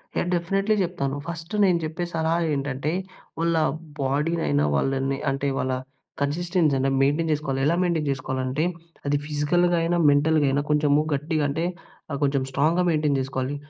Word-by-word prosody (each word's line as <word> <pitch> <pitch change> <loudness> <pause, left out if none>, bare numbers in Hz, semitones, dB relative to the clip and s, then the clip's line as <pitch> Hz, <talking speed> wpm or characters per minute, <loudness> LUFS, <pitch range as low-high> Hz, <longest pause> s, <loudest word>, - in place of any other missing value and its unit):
నేను 175 - 0
డెఫినిట్లీ 195 +5 +1
చెప్తాను. 155 -6 -2
ఫస్టు 165 +3 -5
నేను 180 -3 +3
చెప్పే 160 +3 -3
సలహా 165 +1 +1
ఏంటంటే, 140 +1 -2 0.5
వాళ్ళ 170 0 +1 0.4
బోడీనైనా, 135 - +1
వాళ్ళని 135 - 0
అంటే, 135 +1 -1
వాళ్ళ 130 - 0 0.5
కన్సిస్టెన్సీ 165 +1 +1
అయినా 135 +1 +1
మెయిన్‌‌టైన్ 150 +4 +2
చేసుకోవాలి. 140 -3 -2
ఎలా 165 +3 +3
మెయిన్‌‌టైన్ 165 -4 0
చేసుకోవాలంటే, 130 +1 -2 0.4
అది 145 0 +2
ఫిజికల్‌గా 170 +4 +1
అయినా 170 +1 +1
మెంటల్‌గయినా, 145 -1 +3
కొంచెము 150 -1 +3
గట్టిగంటే, 150 +1 -1 0.5
ఆహ్, 140 - -3
కొంచెం 140 -1 +2
స్ట్రాంగ్‍గా 160 +6 +2
మెయిన్‌‌టైన్ 150 -3 +2
చేసుకోవాలి. 130 +1 -3
150 Hz, 135 wpm, -24 LUFS, 135-165 Hz, 0.5 s, నేను